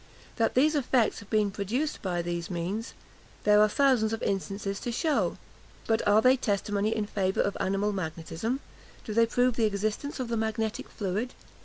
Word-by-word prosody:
That 230 - +1
these 300 +5 +4
effects 255 -5 +2
have 205 - -13
been 210 -2 +2
produced 240 +11 -2
by 175 -3 -1
these 170 -1 -3
means, 190 +6 -3 0.5
there 210 0 +6
are 215 - +5
thousands 240 -3 +3
of 225 - -3
instances 195 0 -2
to 240 - -3
shew. 305 +5 0 0.5
But 225 0 +2
are 210 +2 +5
they 255 +1 +6
testimony 205 -1 0
in 215 - -1
favour 190 -2 0
of 200 - 0
animal 195 +2 0
magnetism? 180 - -3 0.4
do 215 - -4
they 230 +1 +4
prove 245 +1 +2
the 230 - +3
existence 215 +8 -2
of 255 - -2
the 230 0 -1
magnetic 220 0 -2
fluid? 210 +5 -3
215 Hz, 175 wpm, -28 LUFS, 195-235 Hz, 0.5 s, there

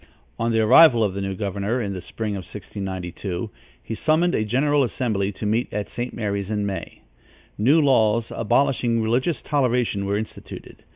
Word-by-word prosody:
On 115 - 0
the 115 0 +2
arrival 120 +1 +7
of 100 -3 0
the 100 - -4
new 95 0 -3
governor, 100 +4 -2
in 100 -4 -3
the 90 - -6
spring 105 +3 -4
of - - -3
1692, 95 +1 -6 0.3
he - - -5
summoned 160 +8 +2
a 110 - +1
general 140 +6 +2
assembly, 110 -6 -1
to 105 - -6
meet 110 +4 0
at 105 0 -3
St. 120 +1 -4
Mary's 100 -3 -3
in 105 -1 -1
May. 100 -1 -6 0.5
New 135 +10 +4
laws 115 -6 +3
abolishing 120 0 +1
religious 125 +9 0
toleration 125 -8 0
were 100 +1 0
instituted. 110 +1 -8
110 Hz, 170 wpm, -23 LUFS, 100-125 Hz, 0.5 s, arrival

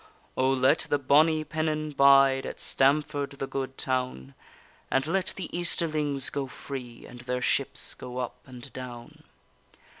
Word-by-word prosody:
O, 130 0 +2
let 130 0 +3
the 145 - +3
bonny 155 +3 +4
pennon 155 -1 -2
bide 135 -1 +5
At - - -7
Stamford, 140 +1 +1
the 135 - -4
good 135 0 -4
town, 125 - -2 0.6
And 135 +1 +1
let 185 +4 0
the 185 -3 -6
Easterlings 155 -5 0
go 140 -1 -3
free, 130 -3 -8
And 120 0 -11
their 125 0 -2
ships 125 - 0
go 125 0 -8
up 125 0 -4
and 125 -2 -11
down. 120 -2 -9
135 Hz, 145 wpm, -27 LUFS, 130-150 Hz, 0.6 s, bide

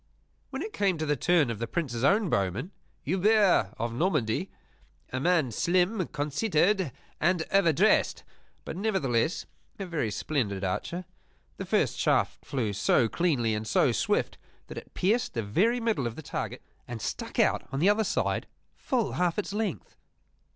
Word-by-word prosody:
When 275 +3 -4
it 430 - -6
came 195 -4 +1
to 155 - -2
the 150 -1 +1
turn 155 -3 +2
of 110 - -5
the 115 - -2
Prince's 125 -6 -3
own 200 +7 +4
bowman, 100 - -1 0.3
Hubert 190 - +3
of 115 +1 -2
Normandy 130 - 0 0.6
a 130 - -1
man 165 -4 +2
slim, 180 - +1
conceited, 170 - +1 0.3
and 175 0 +2
over 195 -4 +4
dressed, 145 - +2 0.4
but - - -5
nevertheless 165 - 0 0.3
a 195 - -4
very 165 -10 -2
splendid 105 -4 -2
archer 170 - -3 0.5
the - - -6
first - - +1
shaft - - +1
flew 115 -7 -2
so 115 +3 +3
cleanly 125 -7 +1
and 110 +1 -3
so - - +3
swift - - 0 0.3
that - - -10
it - - -19
pierced 220 - +1
the 115 - -1
very 205 - +2
middle 225 - 0
of 115 - -6
the 160 - -8
target - - -5 0.2
and 120 -1 -6
stuck - - -5
out - - +2
on 135 - -2
the 175 - +3
other 215 +2 +3
side 195 - -1 0.3
full 250 -7 -1
half 175 -1 0
its 205 -1 -3
length. 205 - -3
165 Hz, 165 wpm, -28 LUFS, 120-195 Hz, 0.6 s, own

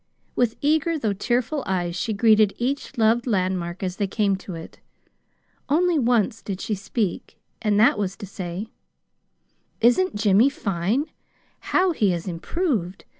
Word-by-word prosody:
With 240 -2 +1
eager, 315 +3 +2
though 220 -8 -1
tearful 245 +8 -1
eyes 175 -2 -1
she 220 - -2
greeted 215 -1 +4
each 275 +2 -3
loved 230 +2 +3
landmark 185 -4 -1
as 185 0 -3
they 200 - 0
came 200 0 +1
to 190 -2 -8
it. 165 0 -10 0.9
Only 335 +2 +3
once 235 -2 +1
did 195 -2 -5
she 215 - -2
speak, 200 0 -3 0.2
and 210 -2 +2
that 220 -1 +5
was 195 -2 -2
to - - -7
say: 185 +2 -6 1.1
"Isn't 245 - +3
Jimmy 210 +4 +4
fine? 205 - -1 0.5
How 370 0 +2
he 215 - +1
has 170 +2 -4
improved! 190 - -2
215 Hz, 145 wpm, -23 LUFS, 190-245 Hz, 1.1 s, that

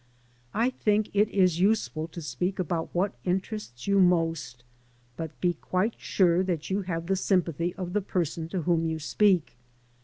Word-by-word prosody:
I 235 +4 +2
think 210 -3 +1
it 205 +1 +3
is 185 -4 +2
useful 190 -5 +1
to 170 0 -8
speak 180 +5 -2
about 170 -2 -2
what 195 +4 0
interests 185 - -3
you 200 0 +3
most; 165 -8 +1 0.5
but 160 +1 -6
be 175 -1 +2
quite 185 +6 -1
sure 180 -2 +3
that 180 -3 -2
you 200 +2 +1
have 170 -3 -3
the 195 +2 +1
sympathy 175 -2 0
of 180 -2 -5
the 210 - +2
person 170 -3 -2
to 180 -2 -2
whom 165 -1 +2
you 160 0 -1
speak. 175 - +2
180 Hz, 165 wpm, -27 LUFS, 165-195 Hz, 0.5 s, it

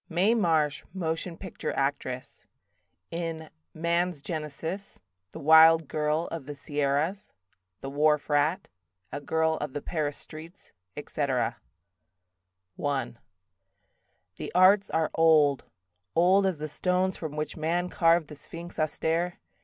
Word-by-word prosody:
Mae 185 +6 +3
Marsh, 160 -9 +1
Motion 165 -1 -2
Picture 190 -3 -5
Actress 135 -2 -3 0.7
In 165 -2 -4 0.2
"Man's 170 -1 0
Genesis", 160 +5 -5 0.3
"The - - -10
Wild 160 +1 +7
Girl 155 +2 0
of 160 -5 -6
the 145 - -6
Sierras", 145 +6 -1 0.5
"The 135 - -5
Wharf 150 +1 +2
Rat", 150 +6 +1 0.4
"A 140 - -5
Girl 160 +2 +1
of 150 -2 -5
the 145 - -4
Paris 150 -4 -2
Streets", 165 +4 -11 0.3
etc. 135 -5 -1 1.3
I 60 - -1 1.2
The - - -6
arts 195 +2 +5
are 160 -1 0
old, 155 -5 +4 0.5
old 185 +4 +4
as 185 -4 -1
the 155 +1 -4
stones 180 +4 0
From 155 -3 -6
which 150 0 -3
man 170 +3 -1
carved 165 -2 +3
the 150 - -10
sphinx 170 +4 -9
austere. 165 +3 0
160 Hz, 120 wpm, -28 LUFS, 150-175 Hz, 1.3 s, Wild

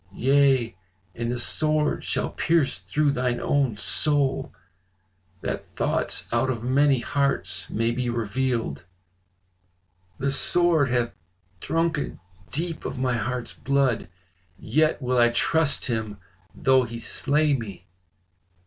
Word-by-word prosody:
Yea, 135 -4 +3 0.4
and 115 +4 -3
a 125 - -2
sword 155 +4 0
shall - - -2
pierce 160 -4 +1
through 150 -1 0
thine 125 -2 -1
own 135 -7 +1
soul, 140 +3 +2 0.9
that - - -3
thoughts - - -1
out 120 +2 +1
of 115 -3 -3
many 135 +2 +3
hearts 140 +1 -1
may 115 +1 0
be 125 0 -2
revealed.' 115 - -2 1.3
The 140 +1 -1
sword 165 -1 +3
hath 120 -1 0 0.5
drunken 165 - -1 0.3
deep 165 +2 -3
of - - -5
my 125 -1 0
heart's 120 +1 -3
blood, 135 -7 0 0.5
yet 155 +11 +1
will 125 0 +1
I 120 0 +6
trust 150 +5 +1
him 110 -4 -3 0.4
though 130 -1 +4
he 115 -1 -5
slay 150 +5 +1
me." 100 -8 -5
130 Hz, 120 wpm, -25 LUFS, 120-145 Hz, 1.3 s, I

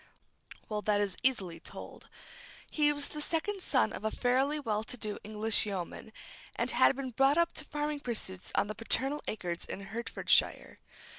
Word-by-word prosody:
Well, 210 -1 -2
that 210 -1 +2
is 205 -2 0
easily 195 -11 +1
told. - - -10 0.6
He 295 -1 +4
was 290 -1 -2
the 300 - -5
second 370 +6 -1
son - - +2
of - - -6
a 220 - +1
fairly 265 +6 +1
well 220 -6 -1
to 250 +2 -3
do 215 -2 -4
English 215 +1 +1
yeoman, 195 +2 -5 0.4
and - - 0
had - - +5
been 265 -1 -4
brought 270 +5 +4
up 340 0 +3
to 305 - -6
farming 295 0 -2
pursuits 215 -8 -3
on - - +3
the 215 - -4
paternal 265 +7 +1
acres 175 -5 -3
in - - -5
Hertfordshire. 230 +4 +1
235 Hz, 170 wpm, -32 LUFS, 210-290 Hz, 0.6 s, had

